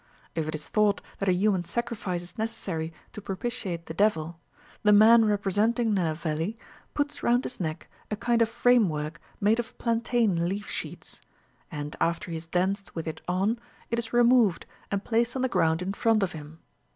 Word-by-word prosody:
If 160 -2 -2
it 155 - -3
is 155 - -7
thought 210 -1 +2 0.2
that 195 - +1
a - - +6
human 185 0 +2
sacrifice 200 -4 -3
is 175 - -13
necessary 185 -8 -3 0.2
to 210 - -7
propitiate 195 -4 -3
the - - -6
devil, 170 -4 +1 0.4
the 210 - +4
man 220 +2 +7
representing 210 +3 +1
Nenaveli 165 +2 -1 0.4
puts 290 0 -1
round 245 +2 +3
his - - -6
neck 160 -2 -4 0.2
a 210 - -1
kind 235 +2 +1
of 225 - +3
framework 175 -11 +2 0.2
made 215 +3 +3
of 240 +1 -5
plantain 230 -7 +1
leaf 200 +1 -4
sheaths; - - -6 0.5
and, 150 -3 -5
after 170 +1 0
he - - -3
has 160 +1 -8
danced 190 +4 -1
with 165 -1 -4
it 160 0 -5
on, 195 +6 +1 0.3
it 235 - +1
is 225 -1 -4
removed, 240 -6 +4 0.2
and 200 0 -1
placed 235 +1 +1
on 260 - -1
the - - +3
ground 160 -7 +1
in 190 +2 -2
front 225 0 +2
of 185 - -1
him. 155 +1 -10
200 Hz, 180 wpm, -27 LUFS, 170-230 Hz, 0.5 s, man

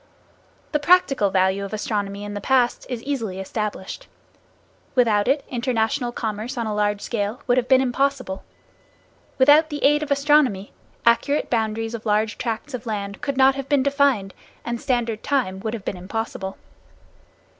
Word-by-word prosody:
The 300 - +1
practical 295 - +4
value 190 +1 +1
of 200 - -6
astronomy 205 -2 -3
in 205 0 -6
the 205 - -5
past 250 +1 +1
is 245 -2 -4
easily 230 -9 -3
established. 200 0 -5 0.9
Without 220 -5 +3
it, 275 +2 +1
international 240 0 -1
commerce 225 +2 -4
on 235 - -1
a 215 - -2
large 205 -1 0
scale 225 +4 -3
would 245 -1 +2
have 250 -1 +1
been 260 0 +5
impossible. 265 -5 -1 0.9
Without 290 +4 +6
the 295 -1 -5
aid 295 +1 +4
of 300 - -4
astronomy, 280 -8 +2 0.3
accurate 260 +5 +2
boundaries 225 -1 -1
of 230 -1 -6
large 210 +1 +1
tracts 235 +4 -4
of 245 -1 -6
land 200 -2 -4
could 280 -2 -3
not 265 0 +6
have 275 0 -6
been 285 -3 +3
defined 280 -8 +2 0.3
and 235 -1 -3
standard 235 -4 -1
time 245 -10 -1
would 220 +3 -3
have 210 - -9
been 185 - -3
impossible. 195 0 -5
235 Hz, 160 wpm, -23 LUFS, 205-270 Hz, 0.9 s, Without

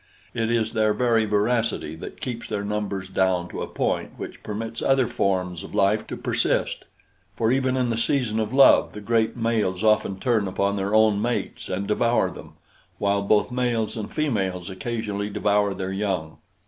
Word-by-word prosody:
It 115 -1 -1
is 115 -2 0
their 110 -1 +2
very 115 -3 +2
voracity 105 -5 0
that - - -9
keeps 120 -3 -5
their 105 -2 -3
numbers 100 -2 -3
down 95 -2 +1
to - - -6
a - - -3
point - - -2
which - - -8
permits 115 +2 -5
other 135 -1 +3
forms 90 -5 -1
of - - -9
life 100 +2 +2
to - - -5
persist, - - 0 0.5
for 115 0 +1
even 130 0 +1
in 125 -2 +1
the 115 - -1
season 115 -2 0
of 110 0 -1
love 135 +1 +6
the 105 - -7
great 110 +2 0
males 110 -5 0
often 110 -3 +2
turn 110 -3 +1
upon 100 +1 0
their 100 +1 -1
own 110 -2 +4
mates 120 +2 -3
and 95 +2 -2
devour 115 +3 +2
them, - - -11 0.4
while 100 0 +1
both 105 +4 +2
males 120 -3 0
and 110 -2 -5
females 95 - -1
occasionally 105 0 -3
devour 105 0 +1
their 95 0 -4
young. 95 -6 -2
105 Hz, 175 wpm, -24 LUFS, 100-115 Hz, 0.5 s, love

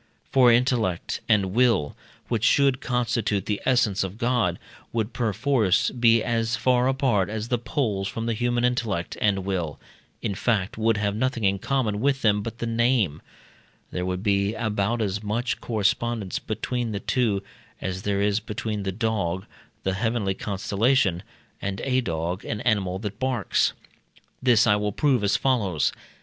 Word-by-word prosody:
For 125 -3 +6
intellect 115 -7 +1
and 100 -3 +3
will, 115 -11 +2 0.3
which 115 -3 -1
should 135 +1 +3
constitute 115 -5 0
the 105 -1 -2
essence 120 -7 +2
of 95 +2 -5
God, 120 -8 +1 0.3
would 115 0 -2
perforce 115 -3 +1
be 115 -2 +4
as 115 -1 0
far 125 -1 +2
apart 130 -8 +1
as 110 +1 -4
the 125 - +1
poles 110 -6 -1
from 115 +4 -4
the 115 - 0
human 120 +1 0
intellect 110 -8 -1
and 100 -3 +1
will, 90 -6 -2 0.4
in 100 - -1
fact, 100 -1 0
would 110 0 +1
have 100 -1 0
nothing 125 0 -1
in 100 0 +2
common 115 -4 0
with 135 0 +1
them 105 -2 +3
but 115 +2 -6
the 120 - -3
name; 115 - +1 0.7
there 90 - -3
would 90 +1 -3
be 100 0 +1
about 110 +1 0
as 100 0 -2
much 110 +4 -2
correspondence 110 -2 -1
between 120 -3 -3
the 100 - -2
two 105 -5 0 0.4
as 95 0 -4
there 100 0 0
is 105 +1 +2
between 105 -1 -4
the 95 -1 -2
Dog, 95 -4 -1 0.4
the 95 - 0
heavenly 110 -1 0
constellation, 100 0 +1 0.4
and 95 0 -3
a 130 -1 +1
dog, 85 -1 -3
an 105 - -4
animal 100 -6 +1
that 105 +1 -6
barks. 130 -6 +1 0.7
This 120 -4 +5
I 105 -3 +4
will 105 -1 -2
prove 135 -5 +2
as 100 - +3
follows. 105 - +1
110 Hz, 160 wpm, -25 LUFS, 100-120 Hz, 0.7 s, For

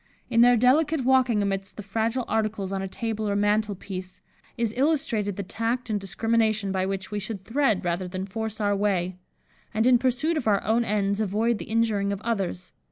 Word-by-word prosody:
In 230 - +5
their 245 0 +6
delicate 285 +5 +3
walking 255 -5 +3
amidst 195 -1 -3
the 210 - -6
fragile 225 +5 -1
articles 215 -3 -1
on 195 -1 -2
a 195 - -3
table 220 +1 -3
or 200 - 0
mantel 205 0 +1
piece, 185 -1 -7 0.4
is 230 -2 0
illustrated 245 - +1
the 200 - -4
tact 230 +5 -2
and 210 - 0
discrimination 215 +1 0
by 190 0 0
which 195 +1 -4
we 210 - -2
should 205 -1 -6
thread 230 -7 +1
rather 175 +1 -1
than 185 +1 -4
force 220 +2 -4
our 205 -1 +1
way; 185 -3 0 0.6
and, 220 +1 +2
in 250 -1 +6
pursuit 265 +6 +1
of 255 - -2
our 200 -2 +3
own 225 +3 +2
ends, 200 -1 0
avoid 215 +2 +1
the - - -6
injuring 220 -3 +1
of 200 - -3
others. 195 -6 -2
215 Hz, 195 wpm, -26 LUFS, 195-230 Hz, 0.6 s, their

